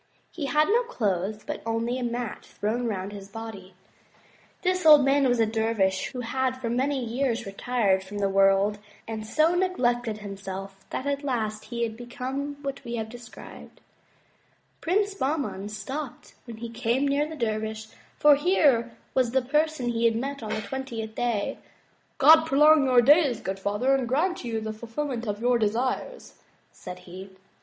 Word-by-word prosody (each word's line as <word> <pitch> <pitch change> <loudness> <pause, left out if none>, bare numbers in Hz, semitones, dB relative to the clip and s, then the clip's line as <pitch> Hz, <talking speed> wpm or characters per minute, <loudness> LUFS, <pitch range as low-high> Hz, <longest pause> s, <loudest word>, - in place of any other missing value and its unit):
He 295 -5 -4
had 300 +2 +3
no 460 +4 +3
clothes 210 - -2
but - - -5
only 230 +2 -1
a - - -3
mat 240 -1 -3
thrown 235 +4 -2
round 195 -2 -3
his 200 -1 -9
body. 200 -3 -9 0.9
This 370 0 +1
old 300 -3 +8
man 275 0 +3
was 245 -1 +1
a 225 - +5
dervish 220 -4 0
who 255 -2 -6
had 260 +2 -1
for 235 -3 -3
many 260 +1 0
years 235 0 -1
retired 200 -1 0
from 200 +2 -8
the 200 -1 +1
world, 195 +1 +3 0.3
and 220 -1 -5
so 315 +7 +3
neglected 245 - 0
himself 195 -1 -7
that 260 - -4
at 280 0 -1
last 220 -6 -2
he 235 +1 -3
had 225 -1 -2
become 260 +4 -5
what 275 0 -5
we 235 -1 -4
have 220 -1 -4
described. 240 0 -12 1.0
Prince 400 +4 +1
Bahman 270 - -2
stopped 245 +6 -6
when 230 -3 -9
he 235 +1 -6
came 240 +4 0
near 285 +2 +1
the 320 - -7
dervish 220 -3 -2 0.3
for 295 0 +7
here 280 -7 +2 0.2
was 255 -2 +2
the 265 +2 +2
first 250 - -17
person 300 -4 +1
he 235 0 0
had 230 -1 +3
met 275 +4 -3
on 220 - -6
the 215 - -2
twentieth 230 -2 -5
day. 230 -3 -1 0.6
'*God 315 +3 +7
prolong 300 +1 +6
your 250 -2 +5
days, 285 -3 +5
good 195 -2 -4
father, 205 +7 +1
and 265 -3 +1
grant 325 +8 0
you 225 -2 -3
the 220 0 -4
ful 220 +2 -10
filment 245 -2 -3
of 205 +1 -3
your 245 0 +3
desires," 250 - -2 0.3
said 180 0 -9
he. 185 +2 -10
240 Hz, 175 wpm, -26 LUFS, 215-275 Hz, 1.0 s, old